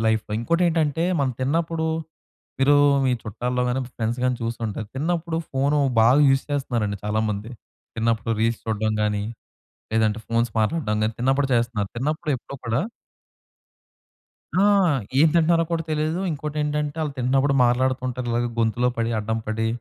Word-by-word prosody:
లైఫ్‌లో. 110 -1 0
ఇంకోటి 170 +9 +1
ఏంటంటే 160 -2 +1 0.2
మనం 135 -3 +1
తిన్నప్పుడు 160 +4 0 0.7
మీరు 145 +2 +5 0.3
మీ 130 - +3
చుట్టాల్లో 125 +4 -2
గాని 125 +2 0 0.2
ఫ్రెండ్స్ 115 +2 -2
గాని 125 -1 +1
చూసి 115 +1 -3
ఉంటారు. 105 +1 -5
తిన్నప్పుడు 165 +2 -1
ఫోన్ 140 +2 +1 0.2
బాగా 120 +5 +5
యూజ్ 135 0 +3
చేస్తున్నారండి 115 -7 -1
చాలామంది. 105 0 -1 0.5
తిన్నప్పుడు 115 0 0
రీల్స్ 115 +1 +1
చూడడం 110 -1 -1
గాని 105 -1 0 0.7
లేదంటే 110 -1 +2
ఫోన్స్ 115 +1 +1
మాట్లాడడం 110 -2 0
గాని 110 +1 0
తిన్నప్పుడు 135 +2 +2
చేస్తున్నారు. 115 -4 0
తిన్నప్పుడు 150 +4 -1
ఎప్పుడూ 135 +3 -9
కూడా 115 +4 +1 1.7
ఆ! 190 - +3 0.6
ఏం 160 - +7
తింటున్నారో 165 0 +4
కూడా 165 -1 0
తెలీదు. 155 +2 0
ఇంకోటేంటంటే 150 0 -2
వాళ్ళు 150 -3 -2
తింటున్నప్పుడు 135 +3 +2
మాట్లాడుతుంటారు. 125 0 0
ఇలాగే 120 +1 0
గొంతులో 115 +2 +2
పడి 115 0 0
అడ్డం 110 +1 -2
పడి 110 +1 -1
125 Hz, 140 wpm, -23 LUFS, 110-150 Hz, 1.7 s, ఏం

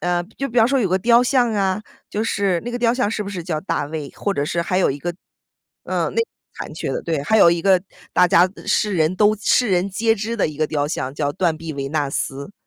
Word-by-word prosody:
呃， 175 0 0 0.2
就 275 0 -2
比 240 - 0
方 225 0 +5
说 275 0 +2
有 205 - +1
个 185 - +2
雕 235 +5 +4
像 250 -2 +2
啊， 195 0 0 0.3
就 210 - -2
是 200 -5 0
那 240 - -4
个 245 - -3
雕 235 0 +2
像 250 -5 0
是 215 -2 -3
不 200 - -6
是 185 -4 -5
叫 160 -3 -3
大 165 -4 -2
卫？ 150 -1 -6
或 200 - -2
者 145 -7 -1
是 170 +3 -1
还 185 +2 0
有 - - +3
一 135 - -1
个 175 - -2 0.7
嗯， - - -2
那 460 - +3 0.3
残 - - -7
缺 - - -4
的， - - -3
对。 160 -4 -1
还 220 - +3
有 170 - +7
一 170 0 0
个 185 0 +3 0.3
大 180 0 +4
家 175 +2 +5 0.2
世 210 -2 +1
人 160 +1 +1
都 210 +1 +4
世 245 +4 +2
人 185 +1 +1
皆 225 +3 +2
知 225 +2 -4
的 205 - +2
一 150 -2 -7
个 155 -1 0
雕 145 -2 0
像， 135 -3 -3
叫 145 -1 -2
“断 175 -4 +1
臂 165 0 -6
维 140 -1 -4
纳 145 -1 -1
斯”。 140 +4 -4
185 Hz, 280 characters per minute, -21 LUFS, 160-215 Hz, 0.7 s, 有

